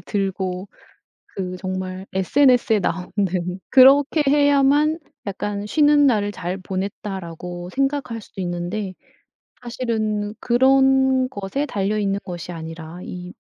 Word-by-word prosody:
들고 190 0 -3 0.7
그 185 -1 -4
정말 185 0 -5
SNS에 245 +3 +3
나오는 180 -1 -3 0.5
그렇게 275 +4 +6
해야만 285 +2 +4 0.3
약간 200 +1 -3
'쉬는 290 +3 +4
날을 210 -6 +2
잘 185 -1 -4
보냈다.'라고 185 -2 -5
생각할 270 -4 -1
수도 200 - -11
있는데 180 +3 -3 0.7
사실은 220 -4 -2
그런 265 +1 +3
것에 205 +5 -3
달려있는 200 -2 -1
것이 175 -1 -7
아니라 165 0 -8
이 180 0 -8
205 Hz, 245 characters per minute, -22 LUFS, 185-265 Hz, 0.7 s, 그렇게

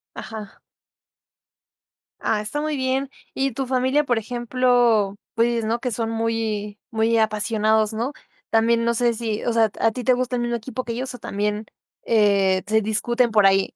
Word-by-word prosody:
Ajá. 215 -3 -8 1.6
Ah, 210 - 0
está 220 +8 -3
muy 305 0 -1
bien. 265 0 -1 0.2
¿Y 270 -2 -1
tu 270 +2 -2
familia?, 260 +3 +1
por 245 -4 0
ejemplo, 240 -3 +2 0.2
pues, 230 0 +1
¿no? 225 +2 -1
Que 250 0 -2
son 225 0 -2
muy 225 -2 -2
muy 225 0 +2
apasionados, 215 0 +1
¿no? 235 +5 -2 0.4
También, 230 +1 +3
no 235 0 +2
sé 235 0 +2
si, 220 -2 -3
o 240 - +1
sea, 225 -2 +3
¿a 225 - +3
ti 245 +2 -6
te 255 - +4
gusta 250 0 -1
el 240 - -1
mismo 240 0 -1
equipo 255 +2 -6
que 235 - -5
ellos, 255 +3 -4
o, - - -11
también 210 +1 -2 0.4
eh, 200 -4 +3
se 220 +1 +3
discuten 235 +3 +1
por 210 -2 +4
ahí? 195 0 +3
230 Hz, 175 wpm, -22 LUFS, 215-245 Hz, 1.6 s, te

